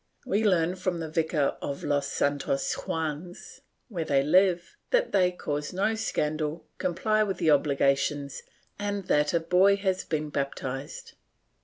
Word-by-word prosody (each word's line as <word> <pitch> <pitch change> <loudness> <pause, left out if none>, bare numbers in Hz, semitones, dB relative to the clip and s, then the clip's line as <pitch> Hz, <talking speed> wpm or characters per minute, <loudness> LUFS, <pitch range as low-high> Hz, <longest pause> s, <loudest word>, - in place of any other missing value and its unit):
We 220 -4 +1
learn 180 -3 +2
from 180 -2 -2
the 160 -2 -5
Vicar 160 -3 0
of 140 - -4
Los 145 -1 0
Santos 140 -1 0
Juanes, 160 +2 -5 0.3
where 180 -9 -3
they 140 -3 +2
live, 180 +3 +3
that - - +2
they 180 -2 +3
cause 150 -4 -4
no 200 +4 +1
scandal, 155 -7 -2
comply 215 +5 +1
with 200 -3 0
the 165 -3 +3
obligations 140 0 +1 0.4
and 205 -1 -2
that 150 0 +3
a 170 - +2
boy 180 +4 +4
has 190 -2 -1
been 155 -1 -3
baptized. 135 -1 -4
165 Hz, 145 wpm, -27 LUFS, 145-190 Hz, 0.4 s, boy